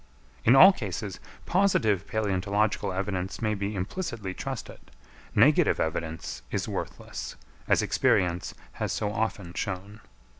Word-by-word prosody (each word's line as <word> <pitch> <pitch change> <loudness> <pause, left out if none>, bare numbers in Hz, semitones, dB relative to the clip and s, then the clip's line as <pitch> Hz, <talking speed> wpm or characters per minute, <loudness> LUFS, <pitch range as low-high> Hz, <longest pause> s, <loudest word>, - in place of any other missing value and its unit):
In 120 - +6
all 190 +8 +10
cases 100 - -5 0.3
positive 110 - +2
palæontological 100 0 0
evidence 95 -1 -2
may 110 -2 0
be 100 0 -3
implicitly 105 - -4
trusted; 135 +4 -6 0.6
negative - - +5
evidence 80 0 -3
is - - -2
worthless, - - -5 0.3
as - - +3
experience 90 -1 +1 0.2
has - - -3
so 105 0 -1
often 105 -5 -2
shown. 100 +3 -5
100 Hz, 115 wpm, -27 LUFS, 95-110 Hz, 0.6 s, all